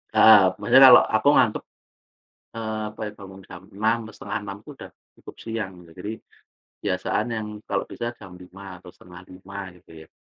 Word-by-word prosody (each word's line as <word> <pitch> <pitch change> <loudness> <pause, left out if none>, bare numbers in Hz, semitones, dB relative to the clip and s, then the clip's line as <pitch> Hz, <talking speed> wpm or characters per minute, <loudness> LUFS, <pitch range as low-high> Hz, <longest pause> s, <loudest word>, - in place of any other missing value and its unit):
heeh, 110 -3 +8 0.2
maksudnya 130 +6 +5
kalo 125 - +10 0.2
aku 110 +6 +1
ngantuk, 105 - +2 0.9
eee, 110 -1 -4 0.2
apa - - -16
ya, - - -10
bangun 95 -1 -12
jam 90 +1 -11
6.00 110 +2 +1
atau 110 - -11
5.30 100 -1 -6
udah - - -12 0.3
cukup - - -13
siang 110 -4 -4
gitu. 85 -1 -17
Jadi 105 +3 -5 0.7
kebiasaan - - -2
yang 110 -1 -4 0.2
kalau 100 - -1
bisa 120 - -6
jam 95 -3 -13
5.00 95 +2 -14 0.2
atau 90 - -13
4.30 90 +2 -13 0.2
gitu - - -26
ya. 80 - -19
100 Hz, 165 wpm, -23 LUFS, 95-110 Hz, 0.9 s, kalo